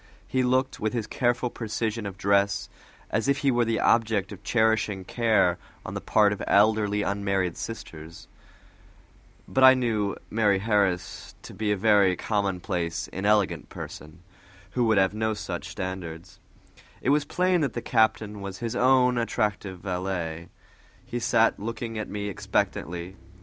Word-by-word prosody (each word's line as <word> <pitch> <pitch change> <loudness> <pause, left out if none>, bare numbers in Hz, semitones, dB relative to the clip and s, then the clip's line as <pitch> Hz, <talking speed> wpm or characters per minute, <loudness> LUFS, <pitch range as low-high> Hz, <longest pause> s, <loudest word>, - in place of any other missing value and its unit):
He 130 - 0
looked, 130 +1 +1
with 110 +1 -1
his 115 -3 -2
careful 120 +1 0
precision 110 -1 -3
of 95 -1 -8
dress, 100 0 +1 0.4
as 110 +4 0
if 140 0 +3
he 135 - +5
were 120 -1 +2
the 115 0 0
object 110 -4 +2
of - - -9
cherishing 110 -4 +1
care 110 -6 +2 0.3
on - - -6
the - - -4
part 105 -2 +3
of 100 - -7
elderly 105 0 +3
unmarried 100 -3 -1
sisters, 85 -7 -8 1.2
but 130 - +1
I 130 0 +9
knew 110 -5 0 0.2
Mari' 105 -2 +3
Harris 100 -3 -1
to - - -10
be 110 -1 -1
a 105 - +1
very 100 -2 +4
common 100 -2 -1
place, 85 -4 -3
inelegant 95 -5 +1
person, 80 +3 -9 0.5
who 125 +2 +1
would 110 -2 +3
have 95 0 +3
no 110 0 -1
such 105 - -5
standards; 90 -2 -6 0.6
it 135 - +1
was 150 0 +3
plain 180 +3 +1
that 140 -6 0
the 120 - -3
captain 110 -2 +1
was 100 -1 -6
his 115 -1 -4
own 125 -1 +4
attentive 105 -5 -2
valet. 90 -3 -3 0.6
He 120 0 -4
sat 115 -1 +2
looking 115 +1 -4
at 110 - -5
me 105 0 -4
expectantly. 90 -1 -2
105 Hz, 155 wpm, -26 LUFS, 95-115 Hz, 1.2 s, I